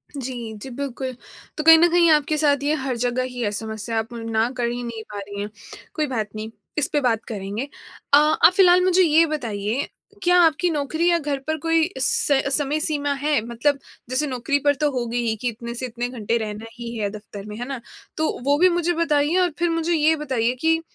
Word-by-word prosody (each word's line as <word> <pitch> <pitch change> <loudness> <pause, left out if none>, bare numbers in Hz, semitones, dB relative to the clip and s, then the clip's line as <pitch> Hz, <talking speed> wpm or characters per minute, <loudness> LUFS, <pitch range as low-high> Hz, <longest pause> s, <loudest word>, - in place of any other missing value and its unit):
जी। 245 -4 -5
जी, 235 +6 -9
बिल्कुल। 260 -1 -5 0.4
तो 305 - -2
कहीं 325 +1 +9
न 340 +2 +5
कहीं 345 -1 +5
आपके 305 0 +2
साथ 285 -2 +2
ये 295 +2 +1
हर 265 -2 -2
जगह 245 +1 0
ही 250 -1 -6
है 205 - 0
समस्या, 220 +1 -3
आप 225 +2 -5
ना 225 0 -1
कर 240 -1 0
ही 245 +1 -4
नहीं 230 -2 -6
पा 205 - -5
रही 200 0 -7
हैं। 205 - -4 0.5
कोई 305 -2 0
बात 225 -6 -2
नहीं, 215 +1 -6 0.3
इस 295 - +2
पे 295 - +2
बात 230 -4 +1
करेंगे। 210 +4 -4 0.5
अ, - - +10
आप 305 +3 +5
फ़िलहाल 360 -1 +6
मुझे 370 0 +4
ये 325 0 +5
बताइए 235 -4 -2 0.4
क्या 355 0 +4
आपकी 330 +1 +3
नौकरी 315 +3 0
या 340 - +4
घर 290 -3 -2
पर 315 0 0
कोई 330 +1 +2
स 460 -11 +2 0.2
समय 295 +1 -1
सीमा 290 -2 0
है? 285 +1 +1
मतलब 255 +5 0 0.3
जैसे 275 +4 0
नौकरी 265 +2 -1
पर 285 - +4
तो 295 - +3
होगी 240 -2 -2
ही 220 - 0
कि 250 - -1
इतने 235 +1 -7
से 255 - -3
कितने 240 0 -4
घंटे 235 -1 -1
रहना 215 0 -5
ही 235 -1 -7
है 205 -2 -1
दफ़्तर 205 -1 -9
में, 210 0 -8
है 245 - -4
ना? 270 -2 -4 0.4
तो 315 - +1
वो 285 +2 +3
भी 365 - +6
मुझे 350 0 0
बताइए 315 0 +1
और 360 -1 +3
फिर 345 - +2
मुझे 330 +1 0
ये 315 0 +3
बताइए 260 -6 -1
कि 325 0 +3
275 Hz, 220 wpm, -22 LUFS, 230-310 Hz, 0.5 s, अ